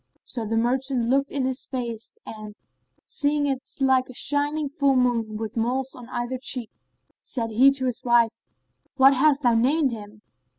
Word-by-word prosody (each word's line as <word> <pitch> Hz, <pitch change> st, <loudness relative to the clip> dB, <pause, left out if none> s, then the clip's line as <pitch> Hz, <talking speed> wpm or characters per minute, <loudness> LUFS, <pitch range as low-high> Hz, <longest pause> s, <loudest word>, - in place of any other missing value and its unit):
So 230 Hz, -4 st, -4 dB
the 225 Hz, +1 st, -1 dB
merchant 250 Hz, +1 st, 0 dB
looked 275 Hz, +2 st, +1 dB
on 275 Hz, -2 st, -1 dB
his 260 Hz, 0 st, -1 dB
face 235 Hz, -4 st, -5 dB
and, 215 Hz, -1 st, -9 dB, 0.5 s
seeing 290 Hz, 0 st, 0 dB
it 265 Hz, -1 st, -3 dB
like 265 Hz, -1 st, +2 dB
a 255 Hz, -, -10 dB
shining 290 Hz, +2 st, 0 dB
full 280 Hz, -2 st, +1 dB
moon, 235 Hz, -4 st, +1 dB
with 220 Hz, 0 st, -5 dB
moles 255 Hz, +3 st, -1 dB
on 245 Hz, -1 st, -11 dB
either 240 Hz, +1 st, -3 dB
cheek, 250 Hz, -3 st, -3 dB, 0.5 s
said 230 Hz, -3 st, -4 dB
he 255 Hz, +5 st, +6 dB
to 260 Hz, -1 st, -2 dB
his 250 Hz, -3 st, -2 dB
wife, 235 Hz, -2 st, +3 dB, 0.6 s
"What 270 Hz, +1 st, +7 dB
hast 280 Hz, +1 st, +3 dB
thou 240 Hz, -2 st, +4 dB
named 270 Hz, +5 st, +2 dB
him?" 210 Hz, -1 st, -9 dB
255 Hz, 170 wpm, -24 LUFS, 230-275 Hz, 0.6 s, What